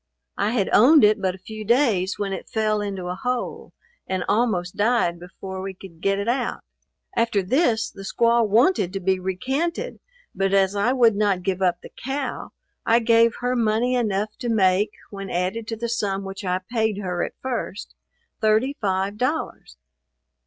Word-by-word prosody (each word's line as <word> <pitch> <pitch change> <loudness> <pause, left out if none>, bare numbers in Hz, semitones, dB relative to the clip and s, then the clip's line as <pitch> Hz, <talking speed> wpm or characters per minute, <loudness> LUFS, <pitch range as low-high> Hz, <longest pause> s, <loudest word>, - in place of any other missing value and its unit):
I 205 - +2
had 200 -6 +1
owned 285 +7 +7
it 210 0 +4
but 190 -1 0
a 185 0 -19
few 215 -1 -7
days 215 -5 +2
when 200 -1 -2
it - - -7
fell 215 -1 0
into 195 -3 -4
a 180 - -2
hole, 250 +4 -3 0.4
and 185 -1 -1
almost 205 -6 0
died 205 -6 +1
before 190 +1 -8
we 190 0 -5
could 175 -3 -13
get 195 +1 +1
it 200 +2 -3
out. 245 +1 -1 0.5
After 230 -4 +1
this, 230 - +1
the 195 - -11
squaw 235 +4 +2
wanted 220 - +3
to 195 - -2
be 190 0 +1
recanted, 270 - -2 0.3
but 195 +1 +1
as 195 0 +3
I 205 +5 +2
would 235 -5 +4
not 200 -3 +1
give 190 0 -1
up 180 -2 +1
the - - -11
cow, 270 0 -3 0.3
I 230 - +4
gave 230 -1 +4
her 250 +1 0
money 230 +1 +1
enough 215 -3 -1
to 245 -2 -3
make, 200 -1 +3 0.2
when 195 -1 -7
added 185 +6 -2
to 225 - -3
the 235 +2 -4
sum 200 -4 -1
which 195 +1 -7
I 185 0 -1
paid 220 -3 0
her 180 -3 -2
at - - -5
first, 245 -5 -4 0.5
thirty 220 +6 +2
five 195 0 -1
dollars. 255 - -3
210 Hz, 180 wpm, -23 LUFS, 190-235 Hz, 0.5 s, owned